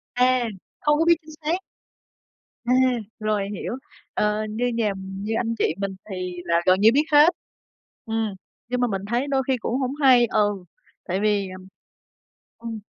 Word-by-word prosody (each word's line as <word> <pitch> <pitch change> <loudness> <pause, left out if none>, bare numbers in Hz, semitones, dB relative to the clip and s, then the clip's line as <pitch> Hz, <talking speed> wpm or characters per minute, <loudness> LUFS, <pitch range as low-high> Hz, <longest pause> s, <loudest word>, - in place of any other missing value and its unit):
À, 250 -1 +3 0.3
không 295 0 +3
có 325 - +3
biết 340 0 +6
chính 310 0 -13
xác. 335 +4 +1 1.1
À, 245 - +1 0.5
rồi 210 -2 0
hiểu. - - -4 0.4
Ờ, 210 +1 +1
như 230 +3 -1
nhà 230 -4 0
như 195 +3 -5
anh 230 -1 -1
chị 160 - +1
mình 195 -1 -3
thì 185 -1 -4
là 170 0 +2
gần 185 +1 +5
như 220 - +7
biết 295 - +4
hết. 295 +3 +8 0.8
Ừm, 220 -2 -1 0.3
nhưng 250 0 -1
mà 245 - +3
mình 195 -4 -3
thấy 245 +4 +1
đôi 270 -1 +1
khi 265 -1 +2
cũng 245 +3 -2
hổng 260 +1 -1
hay 255 -4 +6
ừ, 205 -3 0 0.4
tại 185 +3 -2
vì, 205 -2 +1
ừm 185 0 -10 0.9
ừm. 230 -1 -6
225 Hz, 170 wpm, -24 LUFS, 200-255 Hz, 1.1 s, hết